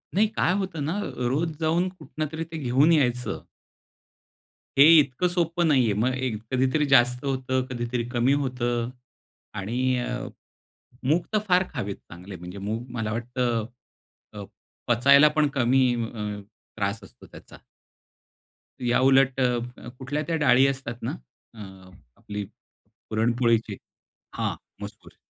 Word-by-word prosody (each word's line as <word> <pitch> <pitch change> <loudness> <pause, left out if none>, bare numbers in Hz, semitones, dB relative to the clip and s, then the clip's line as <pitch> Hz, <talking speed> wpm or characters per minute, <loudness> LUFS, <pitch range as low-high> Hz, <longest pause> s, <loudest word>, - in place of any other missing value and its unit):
नाही, 215 +2 +4
काय 185 -3 0
होतं 185 -7 -3
ना, 175 +7 -2 0.3
रोज 160 +2 -1
जाऊन 165 +3 +1
कुठूनतरी 160 -3 -5
ते 160 - -5
घेऊन 140 +3 +3
यायचं. 125 -6 +1 1.4
हे 140 - +9 0.2
इतकं 140 +5 +1
सोपं 175 -1 0
नाहीये. 125 -8 +3
मग 120 +5 +1
एक 130 -3 -2 0.2
कधीतरी 130 +4 +2
जास्त 125 +1 +4
होतं, 130 -1 -1
कधीतरी 120 -1 -3
कमी 125 +2 +2
होतं. 120 -2 -2 0.6
आणि 125 +6 -1
अ, 125 +2 -4 0.8
मूग 165 +5 +2
तर 215 - +4
फार 180 0 +4
खावेत 100 0 -3
चांगले, 90 +3 -11
म्हणजे 90 +3 -9
मूग 110 +4 -4
मला 110 -2 -2
वाटतं 120 -1 -1 0.7
अ, 105 -1 -7 0.4
पचायला 140 +5 +6
पण 150 - +4
कमी 130 0 +3
अ, 105 -3 -4 0.4
त्रास 100 +1 -2
असतो 95 - -16
त्याचा. - - -14 1.2
याउलट 130 +2 +3
अ, 125 -1 -2
कुठल्या 145 +4 -3
त्या 165 - 0
डाळी 125 +1 +6
असतात 130 -3 -4
ना, 120 - -2 0.4
अ, 110 - -14 0.6
आपली 105 -1 -6 0.7
पुरणपोळीची 115 -1 +1 0.6
हां, - - -1 0.3
मसूर. - - -10
125 Hz, 125 wpm, -25 LUFS, 115-145 Hz, 1.4 s, हे